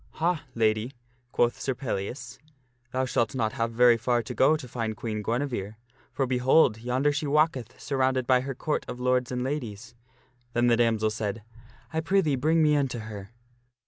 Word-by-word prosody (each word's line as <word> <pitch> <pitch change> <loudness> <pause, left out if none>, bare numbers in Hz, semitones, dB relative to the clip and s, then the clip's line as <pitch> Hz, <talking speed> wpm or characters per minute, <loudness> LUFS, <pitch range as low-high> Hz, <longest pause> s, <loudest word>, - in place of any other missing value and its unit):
" - - -30
Ha, 170 -2 +1
Lady! 110 +2 +1 0.2
" 125 0 -41
quoth 120 0 +1
Sir 130 - -1
Pellias, 125 0 -5 0.3
" 120 0 -43
thou 130 +1 0
shalt 120 -1 0
not 110 -4 0
have 115 0 -1
very 120 0 +5
far 120 0 0
to - - -6
go 155 +4 +4
to 130 - -9
find 115 -3 -4
Queen 110 -2 -3
Guinevere; 115 -3 -2 0.4
for, 135 - 0
behold! 125 -2 +3
yonder 125 +5 +1
she 145 +1 -2
walketh, 140 -5 +1
surrounded 130 -2 0
by 125 0 +4
her 135 0 -5
Court 150 +4 -2
of 125 - -6
Lords 125 0 +1
and 125 0 -2
Ladies." 125 -4 -5 0.6
Then 120 +1 +2
the 120 -1 +4
damsel 110 -2 +2
said, 105 0 -4 0.2
" 125 +6 -26
I 160 - 0
prithee 165 -3 +2
bring 155 +5 +2
me 150 -1 +4
unto 135 -4 0
her." 105 -3 -8
125 Hz, 190 wpm, -27 LUFS, 115-135 Hz, 0.6 s, very